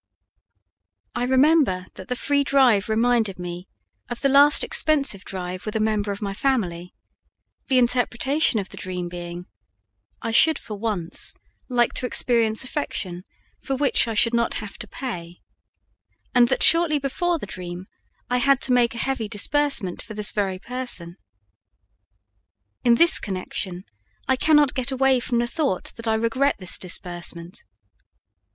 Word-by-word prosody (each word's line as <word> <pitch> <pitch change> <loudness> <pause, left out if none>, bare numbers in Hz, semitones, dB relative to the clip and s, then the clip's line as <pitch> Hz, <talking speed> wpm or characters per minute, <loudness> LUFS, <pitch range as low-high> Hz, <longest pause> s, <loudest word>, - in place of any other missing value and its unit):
I 245 0 -2
remember 260 - +3
that 190 - -11
the 250 - -2
free 285 +2 0
drive 250 -7 +3
reminded 225 -3 +1
me 175 +1 -7 0.4
of 240 - -5
the 275 - +2
last 285 +2 +6
expensive 280 -11 +2
drive 180 -1 -6
with 215 - -5
a - - +1
member 215 -1 0
of 200 +1 -6
my 200 -1 -3
family, 190 -8 -2 0.7
the 265 - +2
interpretation 245 +2 +2
of 190 - -5
the - - -10
dream 180 -1 -5
being: 175 0 -8 0.7
I 230 - -4
should 315 +6 +5
for 215 - -8
once 200 -6 -2 0.3
like 240 -2 +1
to 250 - 0
experience 230 -3 +2
affection 190 -10 -4 0.4
for 270 - -3
which 270 -3 +1
I 225 - -3
should 230 +2 +3
not 235 0 0
have 210 -2 -7
to 215 - -8
pay, 175 -9 -7 0.9
and 245 -2 +5
that - - +1
shortly 330 -2 +5
before 335 +5 -1
the 290 - -7
dream 180 -1 -7 0.4
I 250 - 0
had 275 +1 +3
to 255 - +2
make 240 -1 +2
a 235 - -3
heavy 260 -5 -2
disbursement 225 - +1
for 215 - -10
this 210 0 -1
very 195 -3 -2
person. 195 -7 -3 1.7
In 240 -1 +5
this 335 +6 +6
connection, 185 -1 -4 0.4
I 265 - +3
cannot 295 0 +3
get 255 -1 -2
away 265 0 +2
from 240 0 -2
the 240 - +1
thought 270 - -3
that 230 0 -7
I 220 - +2
regret 230 +6 +1
this 185 -2 -3
disbursement. 175 0 -4
230 Hz, 155 wpm, -23 LUFS, 190-265 Hz, 1.7 s, last